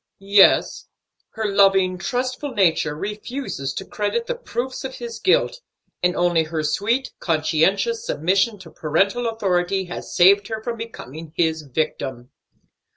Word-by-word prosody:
"Yes, 200 -2 +5 0.5
her 220 -1 -3
loving, 195 -2 +3
trustful 255 +8 -3
nature 165 -6 +2
refuses 210 - -4
to - - -5
credit 215 - -2
the - - -2
proofs 260 - -5
of 265 0 -5
his 235 -2 -7
guilt, 385 +5 +2 0.4
and 180 0 +2
only 175 -2 +2
her 160 0 -3
sweet, 225 - 0
conscientious 170 - +1
submission 195 +7 +1
to 165 -4 -12
parental 195 +10 0
authority 190 -3 0
has 175 - -7
saved 200 +3 +5
her 220 -1 -4
from 235 0 -3
becoming 160 - -9
his 160 -2 +1
victim." 135 -3 -4
195 Hz, 135 wpm, -22 LUFS, 160-230 Hz, 0.5 s, Yes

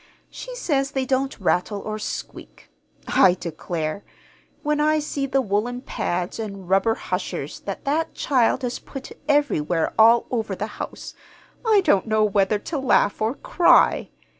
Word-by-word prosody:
She - - -8
says 275 - 0
they 270 -2 -2
don't 265 0 -1
rattle 190 +2 0
or 215 +1 -5
squeak. - - -7 0.4
I 180 -1 +5
declare, 165 +1 -4 0.6
when 300 0 0
I 305 +1 +3
see 290 -2 -2
the 270 0 +1
woolen 230 +4 -1
pads 180 -4 -3
and 200 -4 -6
rubber 195 +4 +3
hushers - - -4
that - - -5
that 310 +4 -1
child 260 -1 +1
has 245 0 -2
put 270 -1 -9 0.2
everywhere 175 - +1
all 230 +2 +6
over 220 -5 -2
the 205 - -3 0.2
house, - - -7 0.5
I 435 -4 +4
don't 225 - +2
know 215 0 +2
whether 205 0 +2
to 295 +8 -4
laugh 255 -6 +2
or 225 +5 0
cry. 345 - +3
230 Hz, 150 wpm, -23 LUFS, 200-275 Hz, 0.6 s, all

